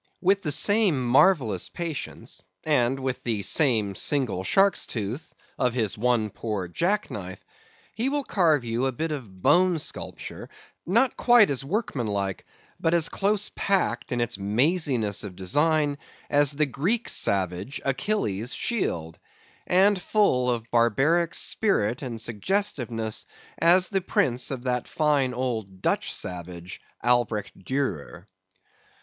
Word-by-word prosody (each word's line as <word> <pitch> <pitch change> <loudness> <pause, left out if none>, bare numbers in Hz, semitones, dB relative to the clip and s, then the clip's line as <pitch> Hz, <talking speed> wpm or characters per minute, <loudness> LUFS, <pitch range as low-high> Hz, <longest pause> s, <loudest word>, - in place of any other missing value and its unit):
With 195 +2 +2
the 150 - -1
same 195 - +2
marvellous 120 - +3
patience, 165 - -6 0.2
and 135 -3 +2
with 130 -1 -2
the 110 -4 -2
same 110 -10 +2
single 120 -5 0
shark's 195 - +2
tooth, 115 +8 -5 0.2
of 125 -1 +1
his 110 -5 0
one 115 -2 +1
poor 105 -5 -4
jack 180 - 0
knife, 95 -2 -7 0.5
he 240 +4 -1
will 290 0 0
carve 160 - +2
you 120 +3 0
a - - 0
bit 160 +6 -3
of 105 -11 -7
bone 175 +5 +4
sculpture, 150 - -6 0.4
not 235 +8 +3
quite 240 -8 +5
as 135 -1 0
workmanlike, 115 - -2 0.3
but 165 +1 +2
as 165 -2 +2
close 205 +1 0
packed 180 -11 0
in 120 -1 0
its 120 -2 -2
maziness 120 - +1
of 100 -3 -7
design, 145 - +1 0.3
as 145 -1 +4
the 150 +2 +2
Greek 180 - -1
savage, 95 - 0
Achilles's 130 - -1
shield; 85 - -2 0.5
and 190 +1 +4
full 160 -10 +2
of 120 -2 -1
barbaric 135 +9 +2
spirit 120 - 0
and 120 -5 -5
suggestiveness, 115 - -1 0.3
as 180 +3 +4
the 195 -2 0
prints 125 -8 0
of 130 -3 -5
that 125 -1 -1
fine 145 -4 +1
old 110 -7 -4
Dutch - - 0
savage, 90 0 -6 0.2
Albert 120 -4 +1
Durer. 95 - -4
130 Hz, 130 wpm, -25 LUFS, 110-170 Hz, 0.5 s, quite